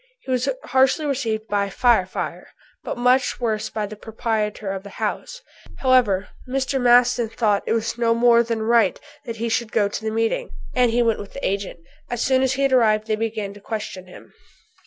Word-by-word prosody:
He 260 - -6
was 255 +1 +1
harshly 265 +4 +2
received 225 -6 -2
by 200 -2 0
"Fire 225 -2 +3
Fire," - - -5 0.4
but - - -4
much 250 +1 +2
worse 220 -2 -1
by 215 -1 -3
the 210 +1 -8
proprietor 215 -2 -3
of 195 -1 -4
the 200 - -11
house. - - -4 0.3
However, 245 -7 +2 0.2
Mr. 265 0 -1
Maston 245 -1 +4
thought 215 -3 +1
it - - +1
was 230 +1 -2
no 230 -1 +3
more 235 0 +5
than 230 -1 -2
right 225 -3 +3 0.3
that 230 -2 -5
he 230 +1 -3
should 225 0 -1
go 210 -3 +2
to 205 - -6
the 220 - -1
meeting, 225 - -1 0.2
and 250 -1 +3
he 240 +1 +2
went 225 -2 +1
with 200 - -9
the 275 - -3
agent. 195 -3 -3 0.3
As 240 -1 -2
soon 260 -1 +3
as 265 0 +2
he 275 +1 -1
had 275 -1 +2
arrived 215 -4 +3
they 220 -1 0
began 215 -2 -3
to 205 - -14
question 195 -4 -6
him. 180 - -14
230 Hz, 200 wpm, -22 LUFS, 215-250 Hz, 0.4 s, more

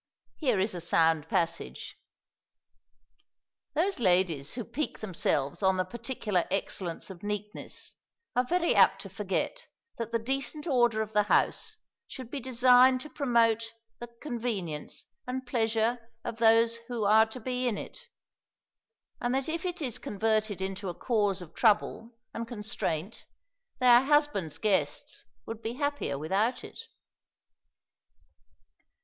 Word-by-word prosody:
Here 250 - +1
is 195 +2 0
a 175 - -4
sound 160 -2 +2
passage: 165 - -2 1.8
"Those 370 +3 +1
ladies 175 - +2
who 240 - -4
pique 305 +3 -3
themselves 155 -8 -1
on 190 -1 +3
the 185 - +2
particular 220 -3 -2
excellence 190 -2 -2
of 180 -2 -11
neatness 210 +1 -6 0.4
are 250 - +4
very 340 +6 +1
apt - - +5
to - - -8
forget - - -3 0.3
that 230 -1 -3
the 230 - +2
decent 270 +5 -3
order 240 -7 +3
of 215 0 -10
the 210 - +5
house - - +2 0.3
should 255 -2 -9
be 285 - -3
designed 255 0 +5
to 305 - -10
promote 230 -4 +2 0.3
the 240 - -6 0.2
convenience 220 - -4 0.2
and 260 +1 -3
pleasure 225 0 +1 0.3
of 225 - -4
those 230 0 +5
who 240 -3 -3
are 220 +2 +6
to 220 +3 -8
be 250 +1 -2
in 220 -4 0
it; - - -8 1.2
and 245 +1 0
that 270 0 -1
if 330 +2 -3
it 350 -3 -3
is 250 -5 -1
converted 215 -2 0
into 190 0 -4
a 175 - -5
cause 205 -6 0
of 165 -1 -14
trouble 220 +1 +2 0.2
and 230 0 -4
constraint, 210 -5 -4 0.5
their 245 -1 +7
husbands' 290 - +2
guests 190 -9 -1 0.2
would 225 0 -6
be 225 +1 -3
happier 285 - -2
without 200 - 0
it." - - -10
225 Hz, 135 wpm, -29 LUFS, 195-250 Hz, 1.8 s, their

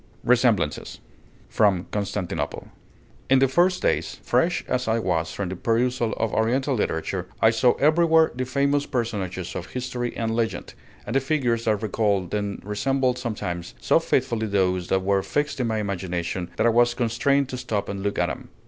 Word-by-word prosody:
RESEMBLANCES 115 - +1 0.5
From 100 -5 +2
'Constantinople' 100 -3 -3 0.6
In 135 - +6
the 135 +1 +4
first 180 +7 +2
days, - - 0
fresh 170 -1 +1
as 125 -1 -1
I 110 0 +2
was 85 -7 -1
from 100 -3 -4
the 95 - -4
perusal 120 +3 0
of 115 - -2
Oriental 130 +5 +1
literature, 90 -4 -2
I 110 - +5
saw 120 +2 +3
everywhere 160 +1 +4
the 130 +1 -3
famous 140 +2 +1
personages 100 -8 -3
of 90 0 -5
history 125 -1 -4
and 115 -1 -1
legend, 115 -1 -2 0.3
and - - -4
the - - +5
figures 130 -5 0
that 110 -1 +1
recalled 100 -4 0
them 100 -1 -3
resembled 125 +5 0
sometimes 90 - -4
so - - +3
faithfully 120 -4 0
those 95 -3 +1
that 95 0 +1
were 100 0 +2
fixed 145 +6 -2
in 125 - 0
my 110 -1 -1
imagination, 90 -3 -3
that - - +2
I 120 - +5
was 120 +1 +3
constrained 125 +3 +1
to 125 - -4
stop 110 -5 -2
and 100 -1 -4
look 100 0 -2
at 90 - +2
them. 80 - -6
115 Hz, 175 wpm, -24 LUFS, 100-125 Hz, 0.6 s, In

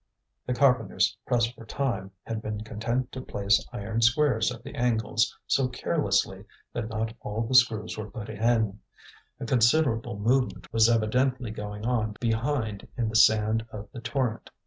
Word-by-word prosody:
The 125 - 0
carpenters, 115 -8 +2
pressed 120 -1 +1
for 115 - -13
time, 115 -5 -2
had 115 -1 -4
been 105 -1 -4
content 115 +4 -2
to 130 - -6
place 100 -3 +1
iron 110 +3 -3
squares 120 -1 +3
at - - -9
the - - -9
angles, 115 -2 0
so 135 -2 +2
carelessly 125 - 0 0.3
that 110 - -3
not 110 0 -2
all 105 +2 -3
the 115 - -4
screws 115 -5 +3
were 105 0 -5
put 105 0 -7
in. 110 -3 +1 0.6
A - - -4
considerable 120 -2 +2
movement 125 +5 0
was 115 0 +5
evidently 125 +2 +1
going 105 0 -6
on 110 -4 0
behind 115 -2 -1
in 115 -2 0
the 110 - -6
sand 110 +1 +4
of 105 -1 -8
the 120 - -8
Torrent. 120 -3 -2
115 Hz, 160 wpm, -27 LUFS, 110-125 Hz, 0.6 s, was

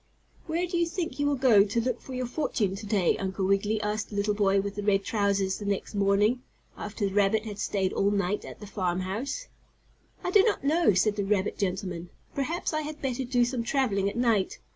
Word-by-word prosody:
"Where 335 +2 0
do 350 0 -2
you 340 - +2
think 335 -3 -4
you 290 - +2
will 290 - +2
go 245 -6 +6
to 205 +3 -1
look 245 +1 -1
for 260 - -8
your 255 0 -1
fortune 235 -7 -1
to 205 +1 -7
day, 200 -5 +2
Uncle 190 0 -2
Wiggily?" 200 +3 +1
asked 210 0 -2
the 210 - -8
little 205 +1 +1
boy 200 -1 +3
with 200 0 -2
the 205 - -4
red 200 -1 +2
trousers 200 -2 0
the 205 - -6
next 200 +1 -2
morning, 205 +4 +2 0.3
after 210 0 -4
the 195 - -5
rabbit 205 +2 +3
had 210 -2 -6
stayed 190 -2 0
all 200 - +2
night 200 0 0
at - - -10
the 210 - -9
farm 185 -3 -1
house. 235 - -3 0.8
"I 360 - -1
do 405 - +7
not 420 -6 +1
know," 305 - +3
said 205 +3 +2
the 200 - 0
rabbit 195 -1 0
gentleman. 180 -3 -2 0.2
"Perhaps 315 +5 -2
I 310 - 0
had 305 0 -6
better 265 -1 -2
do 245 -1 +2
some 245 0 -2
traveling 220 -7 +1
at - - -8
night. 230 -6 +1
210 Hz, 225 wpm, -28 LUFS, 195-255 Hz, 0.8 s, do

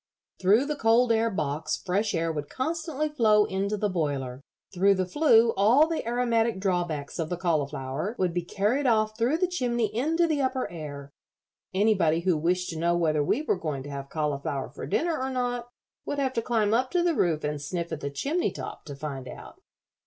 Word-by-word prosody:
Through 205 +8 +4
the 300 +1 -2
cold 235 -1 +3
air 225 0 +2
box 150 -6 -2
fresh 200 +2 -1
air 165 0 0
would 150 -2 -5
constantly 310 +1 -2
flow 220 -8 +4
into 200 +2 -2
the 210 - 0
boiler. 140 -8 -2 0.3
Through 195 +2 +4
the 185 -1 0
flue 230 - +4
all 235 +10 +5
the 325 0 -2
aromatic 235 -3 +1
drawbacks 175 -6 -2
of 160 -1 -2
the 175 - -2
cauliflower 150 - -2
would 180 -2 0
be 175 - 0
carried 210 +10 0
off 215 -2 +2
through 240 +7 +1
the 365 - +2
chimney 240 - -1
into 320 +8 +2
the 310 -3 0
upper 260 -1 0
air. 145 -4 -8 0.6
Anybody 190 -5 +2
who 180 -1 +2
wished 180 +4 0
to 160 - -5
know 170 +1 +2
whether 155 -3 +2
we 280 - 0
were 195 - 0
going 150 -6 -3
to 145 - -8
have 140 0 -6
cauliflower 145 -3 -2
for - - -7
dinner 325 - 0
or 265 - -1
not 245 -2 -2 0.3
would 285 - -4
have 265 -2 0
to 230 - 0
climb 220 -3 +1
up 255 +3 +2
to 355 +3 +1
the 345 -1 +2
roof 165 - +1
and 150 -1 -2
sniff 170 +3 -4
at 160 - -3
the 140 - -3
chimney 290 - -1
top - - -8
to 145 -3 -7
find 135 -2 -6
out." - - -11
195 Hz, 200 wpm, -27 LUFS, 155-245 Hz, 0.6 s, all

